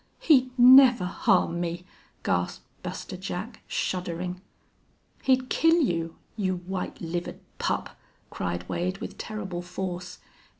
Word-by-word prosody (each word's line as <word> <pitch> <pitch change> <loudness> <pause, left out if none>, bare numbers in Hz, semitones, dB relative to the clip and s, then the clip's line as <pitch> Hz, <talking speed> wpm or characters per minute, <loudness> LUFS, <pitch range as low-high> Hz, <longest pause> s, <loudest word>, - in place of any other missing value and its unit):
"He'd 260 -5 +5
never 250 -4 +8
harm 175 -1 +2
me!" 175 +1 -3 0.4
gasped - - -1 0.2
Buster 190 - -6
Jack, 190 +4 -6
shuddering. 180 0 -3 0.8
"He'd 260 -1 +2
kill 325 +4 +4
you 165 - 0 0.2
you 190 -4 0
white 180 +1 -5
livered 175 +1 -4 0.2
pup!" - - -2 0.4
cried 85 0 -3
Wade, 185 +2 -2
with - - -8
terrible 195 -5 -4
force. 180 0 -5
185 Hz, 115 wpm, -27 LUFS, 175-235 Hz, 0.8 s, never